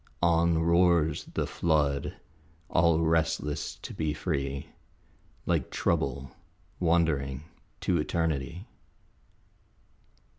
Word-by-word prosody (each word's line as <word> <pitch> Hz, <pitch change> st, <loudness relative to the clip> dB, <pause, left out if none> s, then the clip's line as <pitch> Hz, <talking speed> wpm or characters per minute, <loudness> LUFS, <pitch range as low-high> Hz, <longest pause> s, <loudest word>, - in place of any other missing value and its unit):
On 85 Hz, 0 st, +4 dB
roars 85 Hz, -2 st, +3 dB
the -, -, -2 dB
flood, 75 Hz, -4 st, 0 dB, 0.6 s
all 85 Hz, -1 st, +4 dB
restless 80 Hz, -2 st, 0 dB
to -, -, -6 dB
be 80 Hz, -1 st, -2 dB
free, 70 Hz, -5 st, -3 dB, 0.8 s
Like -, -, 0 dB
Trouble 70 Hz, -1 st, -1 dB, 0.5 s
wandering 75 Hz, -6 st, +1 dB, 0.4 s
to 90 Hz, -3 st, +1 dB
Eternity. 80 Hz, -, -2 dB
80 Hz, 80 wpm, -28 LUFS, 70-85 Hz, 0.8 s, On